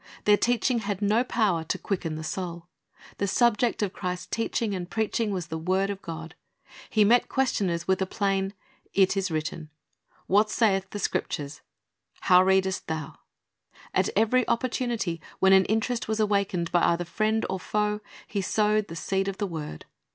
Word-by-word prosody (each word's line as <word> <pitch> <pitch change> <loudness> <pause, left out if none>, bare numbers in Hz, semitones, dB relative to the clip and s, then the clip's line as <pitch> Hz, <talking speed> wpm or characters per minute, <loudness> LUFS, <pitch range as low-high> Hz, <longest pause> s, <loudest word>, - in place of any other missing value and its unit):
Their 210 - +7
teaching 245 +2 +1
had 200 -3 -3
no 210 +3 +2
power 210 -9 +1
to - - -1
quicken 170 -5 -3
the 155 - -6
soul. 170 0 -4 0.5
The 200 - +1
subject 235 +1 +2
of 195 - -2
Christ's 180 -1 -4
teaching 225 -1 -1
and 180 -2 -4
preaching 220 0 0
was 185 -4 -2
the 160 - -3
word 190 +4 +1
of 200 -1 -7
God. 165 0 -7 0.6
He 215 - +4
met 240 +4 +4
questioners 190 -10 0
with 190 0 +2
a 190 - +1
plain, 195 0 -1 0.4
"It 195 0 +4
is 195 -1 0
written." 155 0 -4 0.6
"What 210 +3 +3
saith 195 -4 +1
the 205 - -6
Scriptures?" 145 -6 -3 0.6
"How 180 0 +6
readest 190 0 +2
thou?" 155 -2 -5 0.7
At - - +2
every 225 +4 +3
opportunity, 235 -8 -1 0.2
when 190 0 +5
an 190 -1 +6
interest 225 +3 -1
was 220 0 -1
awakened 200 -5 +1
by 175 - +3
either 170 +1 +2
friend 215 +5 0
or 190 - -3
foe, 210 +2 -1 0.3
He 200 - -2
sowed 210 +1 +1
the 165 - -8
seed 195 +3 -1
of 195 -1 -3
the 205 - -1
word. 155 - -6
195 Hz, 170 wpm, -27 LUFS, 180-215 Hz, 0.7 s, Their